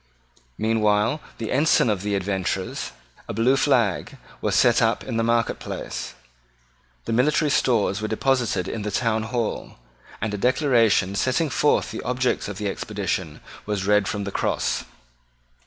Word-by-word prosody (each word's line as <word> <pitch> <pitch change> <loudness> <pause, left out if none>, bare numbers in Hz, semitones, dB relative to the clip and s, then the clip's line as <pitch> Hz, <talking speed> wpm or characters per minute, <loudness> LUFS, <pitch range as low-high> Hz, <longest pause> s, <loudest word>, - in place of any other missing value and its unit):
Meanwhile 110 +5 +1 0.2
the 115 - -4
ensign 145 -1 +3
of 105 -4 0
the 105 0 -1
adventurers, 95 -1 -2 0.4
a - - -5
blue 120 +5 +3
flag, 125 -9 +1 0.2
was - - 0
set - - +4
up - - +1
in 115 - -3
the 115 - +1
marketplace. 115 0 -2 0.9
The - - -2
military 150 +5 +2
stores 110 -7 +2
were 110 - -1
deposited 115 -5 0
in 115 - -4
the 105 - -3
town 110 +1 0
hall; 115 0 -3 0.4
and 105 -1 -2
a 105 - -3
Declaration 120 -6 +3
setting 130 +8 0
forth 150 - +2
the - - -5
objects 125 0 -1
of 100 -2 -6
the 105 - -2
expedition 95 -6 -3 0.3
was 100 -2 -1
read 105 -1 +3
from 105 -1 -2
the 100 - -4
Cross. - - -1
110 Hz, 150 wpm, -24 LUFS, 100-125 Hz, 0.9 s, set